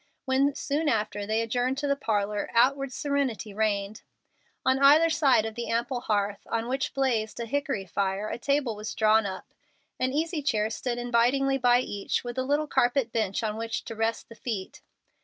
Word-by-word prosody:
When, 270 +1 +2
soon 300 +2 -1
after, 210 -3 -1
they 220 +1 +1
adjourned 245 +3 -1
to 290 0 -2
the 280 - +2
parlor, 210 -6 -1
outward 275 +3 +3
serenity 270 -7 -2
reigned. 205 -1 -1 0.6
On 260 0 +3
either 300 +4 +6
side 275 -8 +3
of 220 - -4
the 235 +1 -5
ample 240 +2 -1
hearth, 205 -2 0
on 230 0 -2
which 265 +2 -2
blazed 240 -6 0
a 235 - -2
hickory 275 -5 -2
fire, 195 +3 -1
a 235 - -4
table 280 -3 0
was 210 +1 -6
drawn 220 -1 +4
up. 190 -1 -8 0.5
An 255 0 +1
easy 315 +2 -1
chair 220 -6 0
stood 240 +2 -3
invitingly 245 +3 +2
by 245 0 +4
each, 205 -5 -2
with 240 +1 -4
a - - +1
little 290 +3 +1
carpet 245 -3 +1
bench 220 -2 -1
on 215 -1 -2
which 225 0 -3
to 225 - -6
rest 225 +1 -1
the - - -12
feet. 220 -5 -5
240 Hz, 185 wpm, -27 LUFS, 215-275 Hz, 0.6 s, either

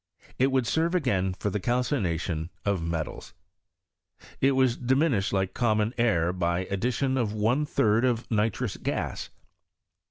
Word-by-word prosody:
5. - - -23
It 135 +2 +3
would 130 -2 +2
serve 165 +7 +1
again 95 - 0
for 105 - -2
the 105 - -1
calcination 95 - -1 0.2
at 100 -2 +1
6. 85 -1 -4 1.1
It 135 +1 +4
was 130 -2 +3
diminished 130 -4 +1
like 95 -1 0
common 110 -1 +1
air 90 -8 +2
by 90 0 -1
addiUoa 115 +2 0
G 150 - 0
third 110 +2 +3
of 120 -2 +1
nitrous 110 0 0
gas. - - -3
110 Hz, 135 wpm, -27 LUFS, 95-130 Hz, 1.1 s, It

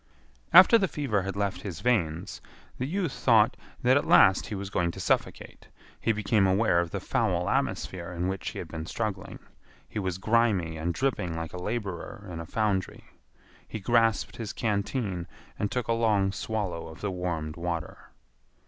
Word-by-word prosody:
After 190 +6 +9
the 190 - +2
fever 135 - -1
had 95 +1 -4
left 100 -3 -2
his 90 -5 -6
veins, 90 -7 0 0.4
the 130 - -1
youth 180 -1 -1
thought 120 -2 +4 0.3
that 130 +2 +5
at 145 - -1
last 95 0 +6
he 105 - -4
was 100 0 -5
going 85 -3 +1
to 85 - -7
suffocate. - - -2 0.3
He 115 - +1
became 105 -2 +2
aware 95 -1 +3
of 85 -1 -1
the - - -3
foul 90 -1 0
atmosphere 90 -1 -1
in 90 +1 -2
which 95 0 -3
he - - -9
had - - -5
been 80 0 -6
struggling. 105 -3 -4 0.5
He 110 - -4
was 95 -3 -2
grimy 105 -6 +2
and 80 +2 -2
dripping 100 -7 -1
like 80 -1 -5
a 90 - -6
laborer 100 -1 -4
in 80 - -5
a 85 - -7
foundry. 105 -3 -1 0.6
He 110 - -5
grasped 115 +1 +2
his 110 -2 -5
canteen 100 -4 -2 0.3
and 105 - 0
took 125 -2 -2
a 115 - +2
long 105 -4 +2
swallow 100 -5 -3
of 80 - -11
the 100 - -2
warmed 85 -4 -3
water. 85 -1 -5
100 Hz, 175 wpm, -28 LUFS, 90-115 Hz, 0.6 s, After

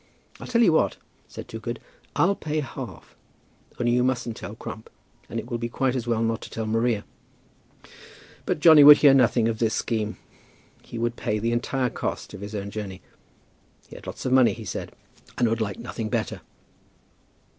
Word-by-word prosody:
"I'll - - -8
tell 235 -1 +3
you 175 -7 +5
what," - - +2 0.3
said - - -9
Toogood; - - -5 0.4
"I'll 195 +3 +3
pay 155 -5 -3
half. 135 - -8 0.6
Only 120 -1 +2
you 125 +1 +3
mustn't 120 -3 -1
tell 100 +1 -8
Crump. 110 -1 -8 0.4
And 115 - -3
it 115 - -7
will 120 -2 -3
be 120 0 -3
quite 130 +1 0
as 120 -2 -3
well 115 -1 +1
not 115 0 -1
to - - -9
tell 110 - -4
Maria." 115 -1 0 1.4
But - - -1
Johnny 155 -3 +9
would 150 +1 +11
hear 145 -2 +6
nothing 125 -3 +4
of 110 -1 -2
this 110 -2 +1
scheme. 110 -2 -2 0.6
He 120 - -9
would 120 +1 -1
pay 105 -3 -1
the 115 +2 -1
entire 125 +1 0
cost - - -4
of - - -9
his 105 +1 -6
own 100 0 -4
journey. 100 -3 -6 0.9
He - - -11
had - - -12
lots - - -7
of 130 - +1
money, 130 -2 +5
he 110 -1 -9
said, 90 - -5 0.5
and 120 - +3
would 115 0 0
like 100 -3 -2
nothing 115 -2 -5
better. - - -2
120 Hz, 190 wpm, -25 LUFS, 110-130 Hz, 1.4 s, would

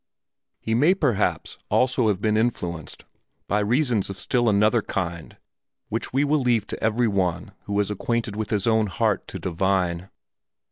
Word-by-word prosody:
He 110 - -2
may 150 +11 +4
perhaps 135 - -1
also 125 -2 +2
have 100 -4 +1
been 105 +1 +1
influenced 90 -8 -2 0.4
by 105 - +1
reasons 115 -1 +1
of 100 - -6
still 120 +1 +1
another 105 +3 +3
kind 85 -4 -4 0.5
which - - -3
we 135 +3 +2
will 150 +1 +2
leave 120 -5 +2
to - - -6
every 115 +2 +2
one 90 -3 -1
who 100 0 -1
is 105 0 0
acquainted 115 +1 -2
with 110 0 -3
his 105 -3 0
own 110 -2 +3
heart 95 - 0
to - - -6
divine. 90 0 -1
105 Hz, 160 wpm, -24 LUFS, 95-120 Hz, 0.5 s, may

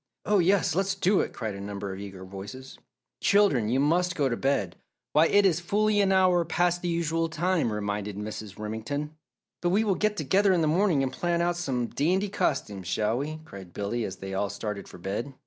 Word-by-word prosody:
"Oh, 210 -1 +3
yes! 185 -1 +3
Let's 195 +2 0
do 195 +1 +2
it!" - - -1
cried 110 -3 -4
a 100 - -7
number 100 -1 -5
of 95 - -8
eager 95 -2 -8
voices. 100 +8 -9 0.4
"Children, 155 - +3
you 130 +3 +2
must 170 +5 +2
go 140 -3 +1
to 120 - 0
bed! 115 -10 0 0.4
Why, 155 +2 +5
it 205 +3 +4
is 175 -4 +3
fully 205 +4 +2
an 195 -1 +2
hour 185 -2 +4
past 175 +1 +1
the 175 - -2
usual 165 -1 0
time," 170 -5 0
reminded 105 -1 -3
Mrs. 105 -1 -6
Remington. 115 +8 -4 0.5
"But 175 - +1
we 200 +5 +3
will 205 -3 +2
get 215 +2 0
together 190 +6 +3
in 175 - +2
the 155 - +2
morning 165 -3 +3
and 130 -1 -2
plan 175 +3 0
out 175 0 +1
some 135 -8 -1
dandy 185 - 0
costumes, 105 - -1
shall 110 +5 0
we?" 155 +2 -4
cried 95 - -11
Billy, 110 +4 -2
as 95 - -4
they 95 0 -7
all 100 +1 0
started 100 0 -5
for - - -12
bed. 105 +9 -4
145 Hz, 210 wpm, -27 LUFS, -, 0.5 s, Why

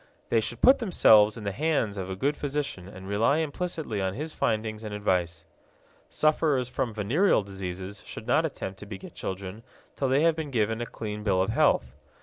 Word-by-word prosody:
They - - +3
should - - -4
put 265 - +7
themselves 110 - +5
in 110 - -7
the 100 - -2
hands 140 -4 0
of 95 -2 -5
a 95 - -3
good 140 +9 0
physician 140 -11 -3
and 95 -1 -10
rely 110 +8 +2
implicitly 160 - -2
on 95 0 -1
his 155 +5 -5
findings 110 -1 -1
and 105 -1 -5
advice. 85 -5 -1 0.6
Sufferers 155 -4 +2
from 125 -1 -2
venereal 110 - +2
diseases 95 0 -6
should - - -8
not - - +3
attempt 95 0 -5
to 105 - -10
beget 100 -2 -9
children 95 +2 -6 0.3
till 135 - 0
they 135 +4 +3
have 165 -1 +4
been 160 -2 -4
given 115 -2 0
a 120 - -3
clean 105 -1 -6
bill 100 -3 +1
of 95 - +1
health. 65 -2 +2
110 Hz, 190 wpm, -27 LUFS, 95-145 Hz, 0.6 s, put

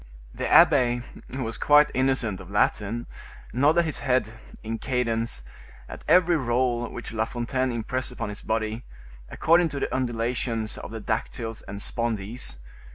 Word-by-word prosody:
The - - -3
abbe, 130 -8 +6 0.2
who 130 0 -4
was 115 0 -5
quite 150 0 +5
innocent 130 -7 +1
of 90 - -12
Latin, 105 +3 0 0.5
nodded 150 +7 +4
his 155 - -2
head, 125 -5 +1 0.3
in 115 0 -4
cadence, 115 - -1 0.4
at - - -9
every 180 -2 +5
roll 120 -2 0
which 120 - -7
La 110 0 +1
Fontaine 125 +2 -1
impressed 125 +3 -2
upon 115 -3 -4
his 105 - -6
body, 110 +1 -2 0.5
according 170 +1 +3
to 140 - -4
the - - -2
undulations 120 -2 -1
of - - -7
the 110 0 -6
dactyls 115 +1 -3
and 100 +1 -5
spondees. 115 - -3
120 Hz, 150 wpm, -26 LUFS, 110-130 Hz, 0.5 s, abbe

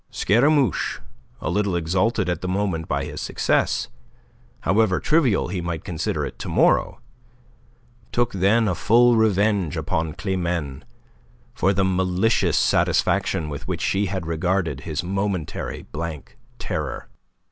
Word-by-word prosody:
Scaramouche, 135 +6 +2 0.4
a - - -2
little 100 -3 0
exalted 90 +5 0
at 90 -2 -2
the 90 - -3
moment 90 -4 -1
by - - -1
his - - -6
success, - - 0 0.7
however 105 -3 +2
trivial 145 - +2
he 90 -1 -3
might 85 -2 -4
consider 85 -4 -2
it - - -8
to - - -5
morrow, - - +2 1.1
took 120 -1 0
then 100 +4 +3
a 95 - +1
full 120 +6 +4
revenge 100 -5 +2
upon 80 -1 -2
Climene 90 -8 -2 0.7
for 95 - +2
the 95 -1 +1
malicious 95 +4 +1
satisfaction 80 - +1
with 70 -2 -7
which - - -3
she 100 +1 +1
had 95 -2 -3
regarded 85 -2 -1
his 75 +2 -4
momentary 95 -3 -3
blank 80 -2 -6 0.2
terror. - - -4
95 Hz, 130 wpm, -23 LUFS, 85-105 Hz, 1.1 s, full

